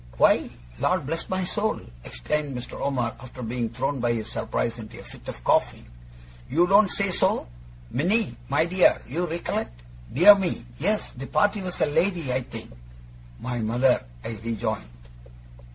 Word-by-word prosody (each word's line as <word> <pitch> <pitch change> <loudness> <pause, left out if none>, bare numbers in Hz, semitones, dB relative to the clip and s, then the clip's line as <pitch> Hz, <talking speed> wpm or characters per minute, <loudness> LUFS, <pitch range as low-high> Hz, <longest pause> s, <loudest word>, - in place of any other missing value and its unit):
'Why, - - +4 0.3
Lord 180 -5 +1
bless 165 +4 -3
my 185 0 0
soul!' 215 +4 -1 0.2
exclaimed 140 - -3
Mr. 125 - -7
Omer, 125 -4 0
after 125 0 -9
being 115 0 -2
thrown 135 +4 -2
by 120 0 +1
his 110 -1 -3
surprise 115 0 -2
into 110 -1 -9
a - - -10
fit - - -12
of - - -7
coughing, - - +2 0.6
'you 165 +6 +4
don't 200 +2 +5
say 200 0 0
so! - - +1 0.4
Minnie, 190 - +1
my 145 +3 +3
dear, 180 +1 +4
you 170 +7 -1
recollect? - - -3 0.3
Dear 175 - +9
me, 190 -11 -2
yes; 210 +7 0
the 135 +2 -8
party 205 0 +2
was 180 -1 -4
a - - +6
lady, 160 -2 +1
I 130 - +1
think?' 115 -3 -9 0.7
'My 125 -1 -3
mother,' 120 +3 +2 0.2
I 115 -2 -5
rejoined. 110 - -2
140 Hz, 160 wpm, -25 LUFS, 120-180 Hz, 0.7 s, Dear